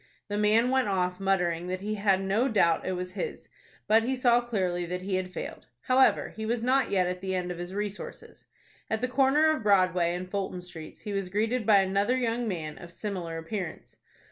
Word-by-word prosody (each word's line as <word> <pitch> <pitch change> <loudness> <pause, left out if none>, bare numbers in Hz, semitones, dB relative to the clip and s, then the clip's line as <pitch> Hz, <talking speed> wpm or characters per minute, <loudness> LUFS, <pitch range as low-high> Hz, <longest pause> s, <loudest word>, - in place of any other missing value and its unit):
The 205 - -2
man 220 +4 +3
went 265 -2 +2
off, 180 -2 0
muttering 180 -3 0
that 185 +1 -3
he 210 +2 -2
had 200 -2 +2
no 205 +7 +1
doubt 170 -9 +2
it 185 - 0
was 180 0 -4
his; 440 - -5 0.4
but 220 +2 +5
he 255 +4 -1
saw 245 -1 +4
clearly 185 -7 -1
that 180 +1 -4
he 195 0 -3
had 185 0 -1
failed. - - -7
However, 260 +1 +3
he 220 - -5
was 230 +1 -1
not 260 0 +2
yet 185 -2 +2
at 180 0 -3
the 190 -1 -2
end 180 -1 -2
of 175 - -6
his 175 +2 -6
resources. 205 0 -6 0.4
At 220 0 -1
the 250 - +1
corner 275 +4 +4
of - - -6
Broadway 185 -4 +3
and 180 +1 -5
Fulton 190 -1 -3
Streets 165 -3 -10
he 205 - -5
was 195 -2 -2
greeted 220 +4 0
by 205 -3 +7
another 200 +6 +1
young 240 -1 -1
man 160 -6 -4
of 175 -1 -11
similar 175 -4 -4
appearance. 175 +1 -6
195 Hz, 210 wpm, -28 LUFS, 180-225 Hz, 0.4 s, by